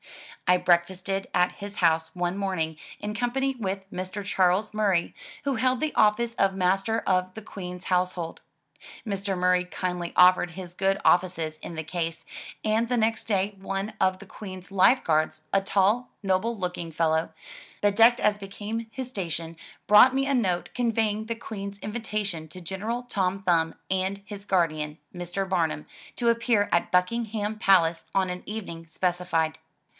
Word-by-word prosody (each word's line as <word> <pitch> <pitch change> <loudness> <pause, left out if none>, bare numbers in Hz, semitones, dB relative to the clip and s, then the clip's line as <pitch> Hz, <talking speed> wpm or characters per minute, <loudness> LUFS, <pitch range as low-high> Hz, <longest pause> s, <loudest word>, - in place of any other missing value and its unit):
I 180 0 +6
breakfasted 185 +2 +1
at 180 0 +3
his 200 0 -8
house 160 -1 +2
one 175 0 -1
morning 185 -5 -1 0.2
in 210 0 -4
com 240 +1 0
pany 270 0 0
with 195 -2 -3
Mr. 185 +2 -5
Charles 190 +2 +2
Murray, 200 -5 +1 0.3
who 275 -2 +1
held 255 +1 +1
the 310 +1 -1
office 230 +2 +3
of 195 -3 +1
Master 195 +4 +1
of 185 -1 0
the 220 - -7
Queen*s 180 -3 -8
Household. 180 -2 -1 0.7
Mr. 195 -1 -2
Murray 180 0 +3
kindly 180 -1 -3
offered 180 -1 +6
his 180 -1 -8
good 195 +1 +1
offices 175 -3 +2
in 170 - -8
the 160 - -3
case, 165 0 -3 0.4
and 220 +2 +1
the 250 - +1
next 225 0 +1
day 200 -1 0
one 195 +2 -3
of 185 0 +3
the 200 - -11
Queen's 185 -2 -9
Life 200 +7 +5
Guards, 155 0 +1
a 195 - +4
tall, 200 +5 +2
noble 195 +4 +1
looking 180 -3 -4
fellow, 160 0 +1 0.5
bedecked 225 +4 +5
as 210 -1 +2
became 210 +3 -5
his 260 0 -5
station, 170 -7 -4 0.3
brought 210 +5 +8
me 270 0 +2
a 280 - +1
note, 185 -9 0
conveying 220 -3 0
the 230 - -2
Queen's 200 -3 -7
invitation 210 -7 -3
to 185 - -10
General 205 +7 -3
Tom 195 -5 -1
Thumb 165 -3 +2 0.2
and 190 +1 -1
his 200 -1 -8
guardian, 155 -5 0 0.2
Mr. 175 +2 -3
Barnum, 160 -5 0 0.3
to 235 -1 +2
appear 230 -3 +2
at 170 - +1
Buckingham 215 +3 0
Palace 170 -5 +4
on 190 -1 +2
an 180 - -5
evening 185 -6 -6
specified. 165 -2 -1
190 Hz, 160 wpm, -26 LUFS, 180-215 Hz, 0.7 s, brought